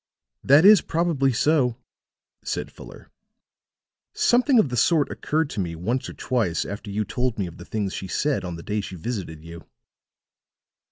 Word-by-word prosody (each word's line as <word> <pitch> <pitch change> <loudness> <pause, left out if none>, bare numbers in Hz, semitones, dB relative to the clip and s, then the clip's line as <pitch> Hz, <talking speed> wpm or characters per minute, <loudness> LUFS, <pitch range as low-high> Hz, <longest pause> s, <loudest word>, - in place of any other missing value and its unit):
"That 145 +6 +6
is 205 -3 +8
probably 160 -5 0
so," 125 -1 +1 0.7
said - - -4
Fuller. - - -13 1.0
"Something 250 +2 +3
of 190 -11 +4
the 125 - -3
sort 145 +6 +2
occurred 155 +1 -1
to - - -5
me 85 -3 -3
once 115 +10 -2
or - - -8
twice 110 -10 -1
after 100 +1 -7
you 105 +2 -2
told 125 0 -2
me 100 - -1
of 85 -1 -9
the - - -11
things 105 -3 -3
she 95 - -5
said 145 +9 -1
on 90 -2 -5
the 85 - -9
day 105 0 -2
she 95 - -8
visited 85 -5 -5
you." 85 0 -10
120 Hz, 170 wpm, -24 LUFS, 95-150 Hz, 1.0 s, is